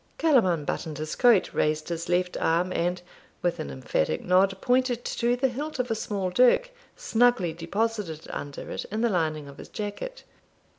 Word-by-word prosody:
Callum 275 Hz, -, +4 dB
unbuttoned 160 Hz, -2 st, -2 dB
his 155 Hz, 0 st, -4 dB
coat, 240 Hz, -6 st, +4 dB
raised 155 Hz, +1 st, 0 dB
his 170 Hz, 0 st, -4 dB
left 180 Hz, 0 st, +1 dB
arm, 175 Hz, +3 st, +1 dB
and, 175 Hz, +1 st, 0 dB, 0.4 s
with 175 Hz, -1 st, 0 dB
an -, -, -4 dB
emphatic 65 Hz, +3 st, -1 dB
nod, 190 Hz, +2 st, +3 dB
pointed 250 Hz, -1 st, +1 dB
to 240 Hz, +1 st, +1 dB
the 265 Hz, +2 st, +2 dB
hilt 285 Hz, +5 st, -4 dB
of 250 Hz, -2 st, -1 dB
a -, -, +4 dB
small 200 Hz, -4 st, -2 dB
dirk, 255 Hz, -, +4 dB, 0.2 s
snugly 245 Hz, -, +2 dB
deposited 175 Hz, -1 st, -2 dB
under 145 Hz, -1 st, -6 dB
it, -, -, -3 dB
in 215 Hz, +2 st, -3 dB
the 235 Hz, -, +3 dB
lining 155 Hz, -6 st, -1 dB
of 140 Hz, -, -12 dB
his -, -, -10 dB
jacket. 215 Hz, -, -6 dB
190 Hz, 170 wpm, -26 LUFS, 165-245 Hz, 0.4 s, Callum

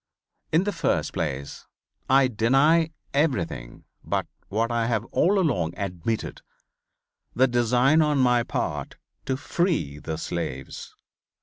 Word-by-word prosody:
In 160 Hz, +4 st, +3 dB
the 205 Hz, -, -1 dB
first -, -, -1 dB
place 70 Hz, +1 st, -4 dB, 0.4 s
I 135 Hz, 0 st, +5 dB
deny 135 Hz, +8 st, +3 dB, 0.2 s
everything 130 Hz, -, -1 dB, 0.2 s
but -, -, -1 dB, 0.2 s
what 115 Hz, +3 st, 0 dB
I 115 Hz, -1 st, 0 dB
have 115 Hz, -2 st, 0 dB
all 200 Hz, +3 st, +3 dB
along 135 Hz, -, 0 dB
admitted, 100 Hz, +2 st, -3 dB, 0.9 s
the 130 Hz, +2 st, +4 dB
design 125 Hz, +5 st, +3 dB
on 150 Hz, -2 st, +2 dB
my 125 Hz, -2 st, +4 dB
part -, -, -3 dB, 0.3 s
to 130 Hz, -, 0 dB
free 150 Hz, -, -1 dB
the 80 Hz, +1 st, -4 dB
slaves. 80 Hz, -6 st, -5 dB
120 Hz, 120 wpm, -25 LUFS, 95-150 Hz, 0.9 s, I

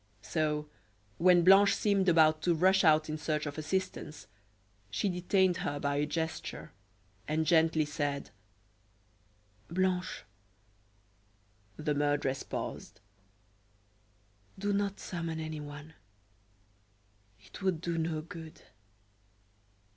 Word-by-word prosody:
So, 150 Hz, +2 st, -1 dB, 0.5 s
when 175 Hz, 0 st, +5 dB
Blanche 195 Hz, +3 st, +7 dB
seemed 195 Hz, -3 st, +2 dB
about 155 Hz, -2 st, +4 dB
to 170 Hz, 0 st, +2 dB
rush 190 Hz, +4 st, +4 dB
out 155 Hz, -1 st, +4 dB
in 155 Hz, 0 st, -4 dB
search 150 Hz, -1 st, -1 dB
of 145 Hz, +1 st, -5 dB
assistance, 155 Hz, -, -3 dB, 0.6 s
she 110 Hz, -, -1 dB
detained 180 Hz, 0 st, +2 dB
her 145 Hz, 0 st, -3 dB
by 140 Hz, 0 st, -1 dB
a 145 Hz, +1 st, 0 dB
gesture, 160 Hz, +1 st, -4 dB, 0.6 s
and 160 Hz, +1 st, 0 dB
gently 160 Hz, -1 st, +3 dB
said: 145 Hz, -4 st, -3 dB, 1.4 s
"Blanche." 185 Hz, +1 st, -1 dB, 1.5 s
The 150 Hz, -1 st, -1 dB
murderess 145 Hz, -2 st, 0 dB
paused. -, -, -6 dB, 1.6 s
"Do 205 Hz, +1 st, -1 dB
not 200 Hz, 0 st, -1 dB
summon 165 Hz, -2 st, -4 dB
anyone; 150 Hz, -1 st, -7 dB, 1.5 s
it 100 Hz, -1 st, -13 dB
would 190 Hz, -4 st, 0 dB
do 170 Hz, 0 st, -2 dB
no 160 Hz, -1 st, -1 dB
good. 160 Hz, -1 st, -10 dB
160 Hz, 100 wpm, -31 LUFS, 150-180 Hz, 1.6 s, Blanche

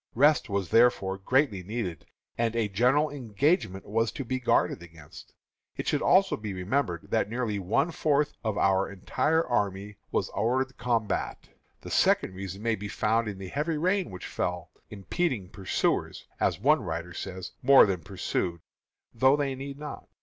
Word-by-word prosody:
Rest 145 Hz, +1 st, +4 dB
was 100 Hz, -4 st, -1 dB
therefore 105 Hz, -5 st, +3 dB
greatly 125 Hz, -1 st, +1 dB
needed, 95 Hz, -3 st, -5 dB, 0.3 s
and 115 Hz, -1 st, 0 dB
a 115 Hz, -2 st, +1 dB
general 125 Hz, +9 st, +2 dB
engagement 125 Hz, -, 0 dB
was 115 Hz, +2 st, 0 dB
to 135 Hz, -, -5 dB
be 130 Hz, +2 st, -2 dB
guarded 120 Hz, -, +1 dB
against. 80 Hz, -4 st, -14 dB, 0.4 s
It -, -, -4 dB
should -, -, +1 dB
also 195 Hz, +1 st, +4 dB
be 105 Hz, -3 st, -6 dB
remembered 90 Hz, -2 st, -2 dB
that 100 Hz, -, +1 dB
nearly 115 Hz, -3 st, -2 dB
one 115 Hz, -, +1 dB
fourth 150 Hz, -2 st, +1 dB
of 110 Hz, -2 st, -1 dB
our 95 Hz, 0 st, +2 dB
entire 155 Hz, -, 0 dB
army 100 Hz, -3 st, -2 dB
was -, -, 0 dB
hors 125 Hz, +5 st, +1 dB
de 130 Hz, -, -22 dB
combat. 115 Hz, -4 st, -2 dB, 0.3 s
The -, -, -9 dB
second -, -, +3 dB
reason 95 Hz, +2 st, -7 dB
may 115 Hz, -1 st, +2 dB
be 105 Hz, -1 st, -4 dB
found 110 Hz, +3 st, 0 dB
in 100 Hz, -2 st, -4 dB
the 95 Hz, -1 st, -7 dB
heavy 150 Hz, -, -1 dB
rains 185 Hz, +4 st, +1 dB
which 90 Hz, -, -8 dB
fell, 90 Hz, -2 st, -3 dB, 0.2 s
"impeding 110 Hz, -, -2 dB
pursuers," 95 Hz, -2 st, -1 dB
as -, -, +1 dB
one 150 Hz, +8 st, +4 dB
writer 85 Hz, 0 st, -5 dB
says, 95 Hz, 0 st, -6 dB
"more 135 Hz, +1 st, +8 dB
than 95 Hz, -4 st, -2 dB
pursued, 85 Hz, +2 st, -3 dB, 0.5 s
though 130 Hz, +4 st, +4 dB
they 140 Hz, -2 st, -1 dB
need 135 Hz, +1 st, -7 dB
not." 150 Hz, -1 st, -8 dB
110 Hz, 165 wpm, -28 LUFS, 95-135 Hz, 0.5 s, more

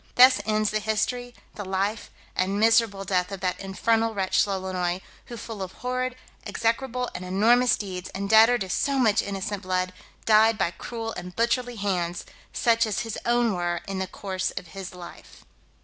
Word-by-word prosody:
Thus 255 Hz, +1 st, +7 dB
ends 215 Hz, -1 st, +1 dB
the 215 Hz, -, 0 dB
history, 220 Hz, +3 st, -2 dB, 0.2 s
the 205 Hz, -, -6 dB
life, 195 Hz, +3 st, -2 dB, 0.3 s
and 195 Hz, +2 st, 0 dB
miserable 225 Hz, -3 st, +3 dB
death 180 Hz, 0 st, 0 dB
of 195 Hz, -, -5 dB
that 185 Hz, -1 st, -1 dB
infernal 225 Hz, +3 st, 0 dB
wretch 190 Hz, +1 st, +2 dB
Lolonois, 185 Hz, -2 st, -2 dB, 0.3 s
who 240 Hz, -, -8 dB
full 220 Hz, -2 st, -7 dB
of 185 Hz, -1 st, -5 dB
horrid, 255 Hz, 0 st, -3 dB, 0.3 s
execrable, 250 Hz, +2 st, -1 dB
and 180 Hz, -, -6 dB
enormous 230 Hz, +7 st, +4 dB
deeds, 185 Hz, -3 st, -6 dB
and 200 Hz, +1 st, -3 dB
debtor 220 Hz, +3 st, +6 dB
to 195 Hz, -, -4 dB
so 280 Hz, +6 st, +1 dB
much 220 Hz, -4 st, +3 dB
innocent 200 Hz, 0 st, -4 dB
blood, 185 Hz, -1 st, -1 dB, 0.3 s
died 220 Hz, 0 st, +5 dB
by 170 Hz, -, +1 dB
cruel 225 Hz, +3 st, -6 dB
and 180 Hz, 0 st, -8 dB
butcherly 240 Hz, +1 st, 0 dB
hands, 180 Hz, -4 st, -2 dB, 0.3 s
such 230 Hz, -1 st, +2 dB
as 215 Hz, -, -1 dB
his 225 Hz, -3 st, -4 dB
own 240 Hz, -2 st, +3 dB
were 175 Hz, -1 st, -1 dB
in 195 Hz, -1 st, -3 dB
the 190 Hz, -, -2 dB
course 190 Hz, -2 st, -3 dB
of 175 Hz, -, -7 dB
his 190 Hz, -1 st, -8 dB
life. 175 Hz, -1 st, -12 dB
205 Hz, 175 wpm, -25 LUFS, 190-230 Hz, 0.3 s, Thus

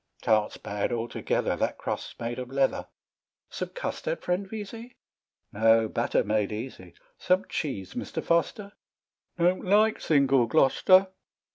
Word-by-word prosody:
"Tarts 110 Hz, -1 st, +2 dB
bad 100 Hz, +3 st, -3 dB
altogether; 120 Hz, 0 st, -1 dB
That -, -, -1 dB
crust's -, -, -5 dB
made 120 Hz, +1 st, -4 dB
of 125 Hz, -1 st, -6 dB
leather." 135 Hz, 0 st, 0 dB, 0.6 s
"Some -, -, -4 dB
custard, -, -, -4 dB
friend 185 Hz, +2 st, -1 dB
Vesey?" 225 Hz, +3 st, -8 dB, 0.6 s
"No 110 Hz, +1 st, +4 dB
batter 115 Hz, +2 st, 0 dB
made 105 Hz, -1 st, 0 dB
easy." 105 Hz, -5 st, -7 dB, 0.2 s
"Some 185 Hz, +2 st, +2 dB
cheese, 100 Hz, -, -4 dB
Mr. -, -, -5 dB
Foster?" 170 Hz, +5 st, 0 dB, 0.3 s
" -, -, -54 dB
Don't 175 Hz, +2 st, +2 dB
like 210 Hz, +3 st, +3 dB
single 135 Hz, -5 st, +3 dB
Glo'ster." 185 Hz, -, +4 dB
135 Hz, 130 wpm, -27 LUFS, -, 0.6 s, No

